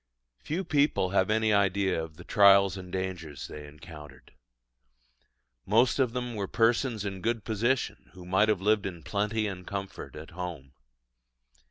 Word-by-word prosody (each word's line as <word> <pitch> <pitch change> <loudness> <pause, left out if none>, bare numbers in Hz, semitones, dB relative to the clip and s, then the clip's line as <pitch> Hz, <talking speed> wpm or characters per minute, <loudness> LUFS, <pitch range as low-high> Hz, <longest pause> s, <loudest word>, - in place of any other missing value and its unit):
Few 170 +6 -3
people 145 - +1
have 95 -1 +2
any 110 0 +2
idea 95 -3 +2
of 80 -1 -10
the 90 - -11
trials 100 -1 +5
and 90 -2 -9
dangers 90 -5 -4
they 75 -1 -9
encountered. 75 -2 -13 1.3
Most 115 +7 +3
of 125 -3 +2
them 125 -1 -3
were 100 -3 -3
persons 115 -1 +1
in 95 -2 -5
good 115 0 -1
position, 115 +5 -1
who 90 -1 -12
might 95 +4 +3
have 105 -4 +1
lived 105 0 +2
in 85 -4 -8
plenty 105 +4 -1
and 95 -3 -6
comfort 100 -1 -6
at 80 +3 -10
home. 85 -7 -7
100 Hz, 155 wpm, -28 LUFS, 90-110 Hz, 1.3 s, trials